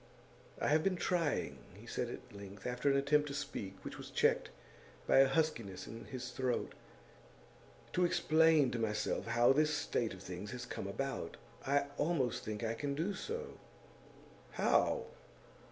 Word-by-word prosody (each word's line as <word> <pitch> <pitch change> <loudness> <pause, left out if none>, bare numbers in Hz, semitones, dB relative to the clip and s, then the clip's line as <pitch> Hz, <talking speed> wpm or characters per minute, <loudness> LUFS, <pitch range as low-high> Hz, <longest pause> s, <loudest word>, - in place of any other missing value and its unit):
'I - - +1
have 155 +1 +4
been 195 0 +2
trying,' 175 -3 0 0.2
he - - -13
said - - -2
at - - -9
length, 100 0 -10
after 125 +3 +1
an 140 - +4
attempt 145 +2 +3
to 140 - -4
speak 100 -8 -4
which - - -6
was - - -8
checked - - +2 0.6
by - - +4
a 135 - +8
huskiness 135 - 0
in 115 0 -8
his 125 +3 -6
throat, 130 -2 -1 1.2
'to 180 - +3
explain 160 -4 +4
to 120 - -2
myself 105 0 -1
how 120 +2 +5
this 155 +2 +3
state 120 -7 -1
of 95 - -12
things 95 +3 -6
has 125 -1 -5
come - - -5
about. - - -3 0.3
I 140 +1 +3
almost 145 -7 +1
think 105 +1 -4
I 115 0 0
can 140 +4 -2
do 170 +7 -1
so.' 460 - -5 0.9
'How? 475 -1 +2
135 Hz, 160 wpm, -35 LUFS, 115-155 Hz, 1.2 s, a